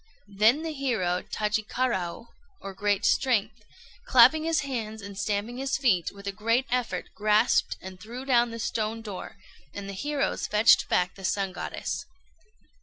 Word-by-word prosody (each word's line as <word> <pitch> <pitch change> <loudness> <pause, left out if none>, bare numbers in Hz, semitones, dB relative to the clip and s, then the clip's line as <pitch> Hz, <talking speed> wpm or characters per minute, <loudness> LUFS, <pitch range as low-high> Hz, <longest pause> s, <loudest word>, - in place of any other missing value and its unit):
Then 235 +9 +5
the 320 -1 -3
hero 220 -11 -1
Tajikaraô, 210 -2 -2 0.3
or 195 - -7
"Great 205 +1 0
Strength," 220 -4 +1 0.4
clapping 315 -7 +6
his 330 -1 +1
hands 225 -5 -4
and 200 -1 -9
stamping 205 +4 -2
his 270 0 -1
feet, 200 - +2
with 200 0 -13
a 200 - -1
great 230 +5 +1
effort 250 -2 -2
grasped 215 +2 +2
and 185 -1 -9
threw 240 +6 -8
down 240 -3 +3
the 230 - -7
stone 225 0 -2
door, 200 -2 -7 0.4
and 200 -1 -6
the 200 - -6
heroes 285 +7 -2
fetched 210 +2 +4
back 180 0 +1
the 195 - -13
Sun 195 0 -1
Goddess. 335 - -5
215 Hz, 155 wpm, -27 LUFS, 200-250 Hz, 0.4 s, clapping